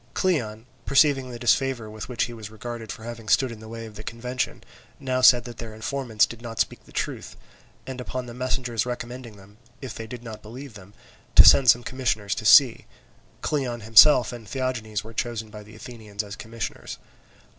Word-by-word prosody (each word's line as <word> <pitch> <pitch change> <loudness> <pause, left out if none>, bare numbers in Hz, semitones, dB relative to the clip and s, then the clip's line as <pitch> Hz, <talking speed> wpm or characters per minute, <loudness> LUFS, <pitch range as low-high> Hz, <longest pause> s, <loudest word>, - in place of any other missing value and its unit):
Cleon, 120 - -1 0.2
perceiving 135 -2 +3
the 120 - -7
disfavour 120 0 +1
with 110 +2 -8
which 120 -2 -1
he 120 - -4
was 110 -2 -9
regarded 115 0 -7
for 110 - -9
having 115 -2 -8
stood 130 +1 +3
in 115 - -9
the 110 - -11
way 115 0 -7
of 110 - -11
the 105 +1 -9
convention, 125 +2 -4 0.4
now 130 -2 -1
said 125 -1 +7
that 120 -1 -10
their 110 -2 -7
informants 115 -1 0
did 115 -1 -11
not 115 -2 -8
speak - - -1
the - - -18
truth; - - -4 0.5
and 130 -1 -6
upon 125 0 -5
the 120 - -9
messengers 125 -2 -2
recommending 120 -2 -7
them, 100 +2 -18 0.2
if 130 -4 -7
they 115 - -8
did 120 0 -9
not 110 -2 -9
believe 125 +4 -10
them, 100 -1 -14 0.4
to - - +10
send 130 -3 +7
some 120 +2 +5
commissioners 115 -6 -1
to 110 - -6
see, 125 +1 +6 0.5
Cleon 125 -6 -2
himself 115 +3 +6
and 115 -3 -10
Theagenes 115 -5 -3
were 110 +1 -11
chosen 115 -2 -4
by 105 - -9
the 105 +1 -15
Athenians 110 -3 -7
as 100 0 -8
commissioners. 115 +2 -7
115 Hz, 195 wpm, -25 LUFS, 110-125 Hz, 0.5 s, to